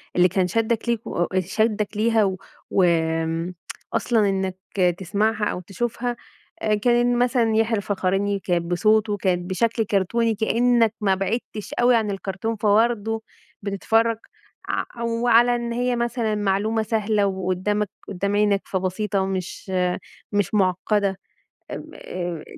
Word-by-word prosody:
اللي 180 0 +6
كان 185 0 +1
شدّك 225 +4 0
ليه 235 - +2
آآ 175 +2 0
شدّك 210 +3 -1
ليها 225 0 +3
و 190 -2 0 0.3
وآمم 165 -1 +1 0.4
أصلًا 220 -4 +2
إنك 190 -1 -1 0.4
تسمَعها 210 +3 0
أو 195 - -2
تشوفها 240 +6 -3 0.5
آآ 215 -1 +2
كان 240 +3 +2
إن 240 0 +2
مثلًا 240 -3 +2
يحيى 225 0 +2
الفخراني 200 0 0
كانت 175 -2 -1
بصوته 210 +4 +2
كانت 180 -2 -1
بشكل 230 +4 +1
كرتوني 215 +3 +1
كأنك 230 +1 +2
ما 195 -2 +3
بعِدتش 210 +2 -3
أوي 245 0 +5
عن 220 -2 +1
الكرتون 195 +3 -3
فبرضه 220 +1 +2 0.4
بتتفرّج 225 +3 +1 0.5
ع 235 - -3
وعلى 235 +1 +4
إن 235 -1 -3
هي 245 +1 0
مثلًا 235 -2 -1
معلومة 210 +2 +1
سهلة 215 -1 +1
وقُدّامك، 190 +2 -1 0.2
قدّام 200 +1 -2
عينك، 205 -1 +3
فبسيطة 190 +1 -1
مش 190 0 -5 0.6
مش 205 -1 +1
مُعقّدة 195 0 +1 0.5
م - - -7
آآ 175 -3 -5
210 Hz, 130 wpm, -23 LUFS, 190-225 Hz, 0.6 s, اللي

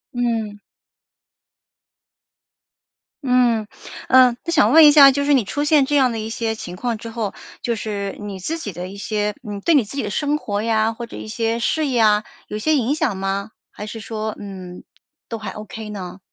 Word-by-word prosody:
嗯。 225 -4 -2 2.7
嗯， 240 -4 +2 0.4
呃， 255 -1 +6
那 335 - -3
想 255 -6 +4
问 320 -1 +9
一 295 - +9
下， 280 -2 +9
就 285 +1 -1
是 290 0 +3
你 245 -7 +3
出 290 +8 -2
现 295 -2 +4
这 290 +1 -1
样 260 -3 +4
的 225 - -4
一 220 +1 -4
些 225 -1 -2
情 180 -4 -8
况 235 +2 -2
之 230 +1 -8
后， 225 -3 -3 0.3
就 235 - -1
是 205 -2 -4
你 205 -2 -6
自 315 - -4
己 205 - -6
的 180 +2 -6
一 200 - -10
些 210 0 -2
嗯， 200 -1 -5
对 330 +5 +3
你 250 -7 +4
自 245 - -10
己 275 - -1
的 205 - -3
生 295 +7 0
活 205 -7 -3
呀， 220 0 +1
或 235 +1 -7
者 - - -11
一 215 - -8
些 230 +1 -1
事 305 +5 0
业 245 -4 +1
啊， 210 0 +4 0.2
有 210 - -4
些 310 +8 +1
影 265 +1 +1
响 290 -11 0
吗？ 195 +2 -3 0.2
还 210 - -8
是 225 +1 -7
说， 220 -1 -4
嗯， 185 -3 -9 0.5
都 230 - -4
还 215 - -6
OK 215 0 -8
呢？ 185 -2 -7
225 Hz, 220 characters per minute, -21 LUFS, 205-255 Hz, 2.7 s, 问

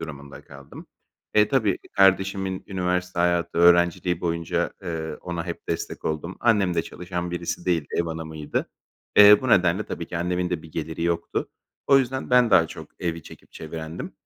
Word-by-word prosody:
durumunda 70 -3 -9
kaldım. - - -13 0.5
E, 105 0 +5
tabii 110 -8 +1
kardeşimin 95 -1 +2
üniversite 90 -1 -2
hayatı, 85 -1 +1
öğrenciliği 85 0 +4
boyunca, 85 0 -1
eee, 80 -3 -4
ona 85 -2 -5
hep - - -7
destek - - -4
oldum. 80 +4 -3
Annem 105 -6 +2
de 85 - +1
çalışan 90 0 -5
birisi 85 0 -4
değildi, 85 -5 0
ev 85 - +1
hanımıydı. 80 -2 -4 0.5
Eee, 105 0 +9
bu 130 - -3
nedenle 90 -2 +3
tabii 85 - -6
ki 90 - -5
annemin 90 +1 -1
de 85 -3 -2
bir 80 - -14
geliri 80 +1 -4
yoktu. 85 0 -1 0.4
O 135 - +6
yüzden 130 0 -2
ben 125 -2 +5
daha 85 -4 +6
çok - - -10
evi 85 -2 -3
çekip - - -15
çevirendim. 80 +1 -7
85 Hz, 165 wpm, -24 LUFS, 85-95 Hz, 0.5 s, Eee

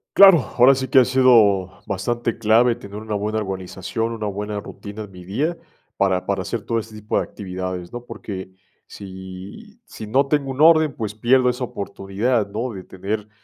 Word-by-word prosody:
Claro, 195 -5 +9 0.2
ahora 130 +3 +7
sí 130 0 -3
que 135 -2 +6
ha 125 - +5
sido 110 -8 +4
bastante 115 +4 -2
clave, 115 +2 +4
tener 100 -3 -10
una 110 0 -5
buena 105 +2 -1
organización, 95 +3 -4
una 110 -2 -4
buena 105 +1 -4
rutina 105 +1 -8
en 105 - -12
mi 90 -1 -12
día, 145 - -2 0.4
para 95 -2 +1
para 100 -1 -1
hacer 110 +4 -3
todo 115 -1 0
este 110 0 -9
tipo 105 0 -2
de - - +1
actividades, 95 -1 -6
¿no? 120 - -6
Porque 100 -5 -7 0.4
si 95 - -10
si 110 - -9
no 135 +5 +2
tengo 140 -1 0
un 135 +3 -3
orden, 155 -3 +6
pues, 105 -2 -4
pierdo 125 +3 +3
esa 125 +1 -2
oportunidad, 100 +1 -2
¿no?, 115 +4 -3
de 95 -2 -8
tener, 105 +4 -5
110 Hz, 185 wpm, -21 LUFS, 100-125 Hz, 0.4 s, Claro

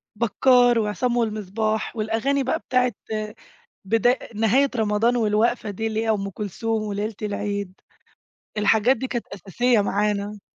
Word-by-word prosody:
بكّار 245 +1 +4
وعصام 235 +3 -1
والمصباح 215 0 -1
والأغاني 225 +6 0
بقى 260 - -1
بتاعة 250 -1 +1 0.9
بدا 225 +4 +3
آآ، 255 - -5
نهاية 235 +6 +3
رمضان 220 +2 +2
والوقفة 220 0 +1
دي 220 +3 -3
اللي 220 0 -1
هي 225 - -1
أم 200 -2 0
كلثوم 215 +3 -3
وليلة 210 +1 -3
العيد، 200 -2 -4 0.8
الحاجات 220 +5 +3
دي 260 +3 -3
كانت 240 -2 -3
أساسية 210 +4 0
معانا. 205 0 -1
220 Hz, 130 wpm, -23 LUFS, 205-240 Hz, 0.9 s, بكّار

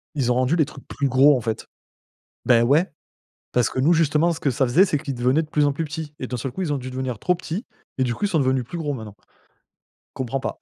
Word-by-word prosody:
ils 125 -4 +1
ont - - +2
rendu 130 +5 +2
les 155 -4 +3
trucs 140 -2 -13
plus 140 - -1
gros, 135 +2 +5
en - - -4
fait. 110 -1 -4 0.8
Beh 120 -2 +5
ouais! 145 +10 +3 0.6
Parce 125 -3 +2
que 130 - -2
nous, 155 +6 +4
justement, 165 +1 +3
ce 165 - -5
que 140 - +1
ça 130 +2 +1
faisait, 155 +11 +5
c'est 155 -7 0
qu'ils 140 -2 -5
devenaient 130 +6 +2
de 155 - -9
plus 150 -1 +2
en 145 - +2
plus 160 +4 -3
petits, 150 0 -6
et 130 - -3
d'un 125 - -3
seul 125 +2 -4
coup, 190 - -4
ils 155 - -1
ont 140 - 0
dû 130 0 -7
devenir 130 -3 -4
trop 180 - +1
petits, 180 +5 -5 0.3
et 130 - +2
du 120 - -1
coup, 205 - -4
ils - - +2
sont 165 - +1
devenus 130 -2 +1
plus 170 +8 -7
gros, 150 -3 -2
maintenant. 110 -4 -9 1.0
Comprends 130 +1 -3
pas. - - -4
135 Hz, 270 wpm, -23 LUFS, 125-155 Hz, 1.0 s, gros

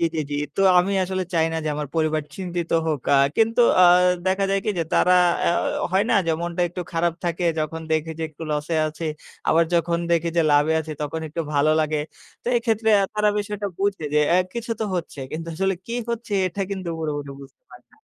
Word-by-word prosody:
জি, 170 - +2
জি, 155 - 0
জি। 145 - -2 0.2
তো - - 0 0.2
আমি 190 +3 +2
আসলে 185 0 -2
চাই 160 - +3
না 165 - -2
যে, - - -1
আমার 150 -1 -4
পরিবার 155 -1 +1
চিন্তিত 175 -3 -4 0.2
হোক। 155 -4 -1
আ - - +6 0.2
কিন্তু 225 +2 +3 0.2
আ 180 - +8 0.4
দেখা 190 +1 +1
যায় 195 - +2
কি 215 - +1
যে, - - +2
তারা 180 - +4 0.3
আ - - +4 0.4
হয় 190 - +4
না - - +4
যে, - - +2
মনটা 175 0 -3
একটু 175 - -6
খারাপ 170 0 +1
থাকে, 170 +1 -1
যখন 155 +1 -2
দেখে 160 +1 0
যে - - -3
একটু 155 +1 -12
লস 150 0 -1
এ - - +2
আছি, 155 +2 -7 0.4
আবার 165 +1 +4
যখন 170 0 +1
দেখি 170 0 +2
যে, 170 - +4
লাভে 145 +2 +4
আছি, 155 0 -7
তখন 150 +2 -3
একটু 165 +3 -4
ভালো 145 +1 +3
লাগে। 155 -1 0 0.4
তো - - -29
এক্ষেত্রে 225 -2 0
আ - - +2
তারা 210 0 +2
বিষয়টা 205 0 -3
বুঝে 195 -5 -1
যে, 150 - +5
অ্যা 175 - +5 0.2
কিছু 235 0 -5
তো 220 - +1
হচ্ছে। 165 -4 -6
কিন্তু 165 +1 -5
আসলে 195 +2 0
কি 235 - -4 0.2
হচ্ছে, 230 -2 -5
এটা 190 +3 -5
কিন্তু 190 -3 -4
পুরপুরি 145 -3 -3
বুঝতে 140 - -16
পারে - - -15
না। - - -23
170 Hz, 220 wpm, -23 LUFS, 155-195 Hz, 0.4 s, আ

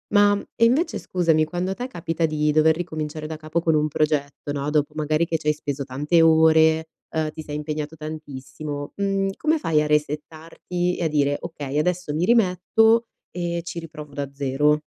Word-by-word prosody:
Ma 205 0 +6 0.3
invece 265 +9 +3
scusami, 165 -4 +1
quando 180 +4 -2
te 245 - -4
capita 170 -7 -2
di 150 -1 +1
dover 155 +1 +4
ricominciare 155 -2 -4
da 160 - -5
capo 155 +2 -2
con 160 -2 +2
un 150 0 +2
progetto 145 -1 -1
no, 140 0 -3
dopo 150 0 +1
magari 155 +2 +1
che 165 - 0
ci 155 - -16
hai 150 - +3
speso 145 -2 -4
tante 150 +6 +2
ore, 160 0 +5 0.3
ehm, 160 -1 0
ti 155 0 -8
sei 150 0 -5
impegnato 150 0 -4
tantissimo, 145 -1 -7
mhmm, 195 -1 0
come 315 +1 +1
fai 155 - +2
a - - -2
resettarti 155 +4 -2
e - - -2
a - - +2
dire: 145 -2 +1
"Okay, 145 -4 -5
adesso 175 -1 0
mi 170 - +1
rimetto 225 +2 +3 0.2
e 170 -1 -3
ci 170 - -7
riprovo 150 -3 -8
da 140 -1 -3
zero"? 145 +2 +2
155 Hz, 180 wpm, -23 LUFS, 150-170 Hz, 0.3 s, Ma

